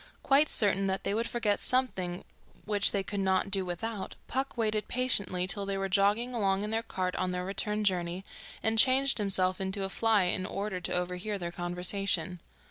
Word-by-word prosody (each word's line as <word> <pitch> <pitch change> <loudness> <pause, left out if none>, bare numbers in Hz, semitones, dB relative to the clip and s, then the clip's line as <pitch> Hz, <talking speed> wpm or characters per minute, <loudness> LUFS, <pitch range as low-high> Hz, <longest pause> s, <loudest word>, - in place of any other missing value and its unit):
Quite 280 +2 +4
certain 195 -2 +2
that 190 0 -2
they - - -1
would 230 +2 -1
forget 215 -4 0
something 190 -9 0 0.4
which 205 -1 +2
they 200 -1 -1
could 200 +1 -4
not 190 0 +1
do 190 -1 +2
without, 190 +4 -5
Puck 265 0 -3
waited 215 -2 -1
patiently 200 -8 +1
till 200 +2 -1
they 195 0 -1
were 195 0 -2
jogging 205 +6 +2
along 195 -3 0
in 210 - -3
their 225 0 +1
cart 185 -5 -3
on 185 0 -1
their 180 0 -3
return 210 +2 -1
journey, 180 -1 -1 0.4
and 220 0 +3
changed 265 +1 +5
himself 190 -2 +2
into 190 +1 -2
a 195 - -2
fly 220 -1 +2
in 185 +1 -1
order 195 -2 -4
to - - -3
overhear 180 +3 -2
their 175 -2 -5
conversation. 180 0 -2
195 Hz, 190 wpm, -30 LUFS, 185-215 Hz, 0.4 s, changed